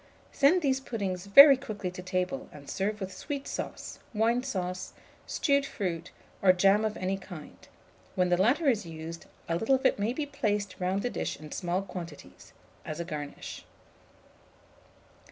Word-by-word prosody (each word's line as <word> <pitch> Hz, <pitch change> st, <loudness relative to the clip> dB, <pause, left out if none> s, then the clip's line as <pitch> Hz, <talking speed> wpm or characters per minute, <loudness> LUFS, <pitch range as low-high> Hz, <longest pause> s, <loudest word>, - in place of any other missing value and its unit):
Send 315 Hz, +6 st, +4 dB
these 265 Hz, -2 st, +2 dB
puddings 200 Hz, -7 st, -4 dB
very 275 Hz, +7 st, +10 dB
quickly 215 Hz, -8 st, -5 dB
to 180 Hz, -, -8 dB
table, 180 Hz, -6 st, -2 dB
and 145 Hz, -1 st, -13 dB
serve 210 Hz, +2 st, -2 dB
with 190 Hz, -1 st, -5 dB
sweet 280 Hz, -2 st, -5 dB
sauce, -, -, -5 dB, 0.2 s
wine 230 Hz, +3 st, +2 dB
sauce, 185 Hz, -8 st, -4 dB, 0.3 s
stewed 280 Hz, -2 st, +2 dB
fruit, 175 Hz, -10 st, -3 dB, 0.3 s
or 190 Hz, -, +7 dB
jam 195 Hz, +3 st, +4 dB
of 215 Hz, -1 st, -1 dB
any 190 Hz, +1 st, -1 dB
kind: 175 Hz, -6 st, -11 dB, 0.5 s
when 180 Hz, -1 st, +2 dB
the 175 Hz, -, +3 dB
latter 280 Hz, -, +3 dB
is 225 Hz, -6 st, +3 dB
used, 165 Hz, 0 st, -8 dB, 0.2 s
a 165 Hz, -, 0 dB
little 225 Hz, +8 st, +3 dB
of 265 Hz, -, -3 dB
it -, -, +3 dB
may 210 Hz, +3 st, +1 dB
be 290 Hz, +4 st, -2 dB
placed 205 Hz, -8 st, -2 dB
round 185 Hz, +2 st, 0 dB
the 245 Hz, -, -1 dB
dish -, -, -3 dB
in 155 Hz, -1 st, -10 dB
small 180 Hz, +1 st, -1 dB
quantities, 170 Hz, -5 st, -9 dB, 0.3 s
as 155 Hz, +1 st, -6 dB
a 170 Hz, -, -3 dB
garnish. 145 Hz, -3 st, -6 dB
195 Hz, 165 wpm, -29 LUFS, 180-245 Hz, 0.5 s, very